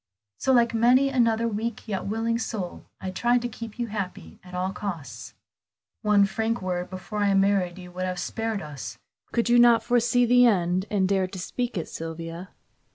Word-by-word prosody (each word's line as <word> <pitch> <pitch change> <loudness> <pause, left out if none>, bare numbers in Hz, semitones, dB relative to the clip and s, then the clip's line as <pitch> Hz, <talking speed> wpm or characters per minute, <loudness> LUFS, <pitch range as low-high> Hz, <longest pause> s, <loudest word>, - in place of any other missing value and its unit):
So 265 - +1
like 235 -2 +4
many 250 +4 +4
another 230 -3 +2
weak 230 +2 -3
yet 200 -3 -3
willing 225 +2 0
soul, 205 -6 -5
I 190 - -4
tried 240 +5 +2
to - - 0
keep 230 -1 -8
you 240 - -1
happy 185 - -6
at 180 0 -10
all 185 +1 -1
costs." 175 -9 -6 0.7
"One 210 -2 +4
frank 225 +3 -1
word 180 -1 -3
before 190 +3 -6
I 200 -1 +3
married 195 -2 +2
you 180 -1 -10
would 185 +1 -3
have 185 0 -3
spared 225 +2 -3
us 150 -2 -7
this. - - -25 0.3
Could 235 0 0
you 240 0 +6
not 235 -2 +6
foresee 245 +1 +3
the 245 +1 +6
end 185 -2 +1
and 195 -3 +2
dare 190 -1 +1
to 185 - -9
speak 240 +5 -3
it, 165 - -3
Sylvia?" 165 +2 -6
205 Hz, 190 wpm, -26 LUFS, 185-235 Hz, 0.7 s, you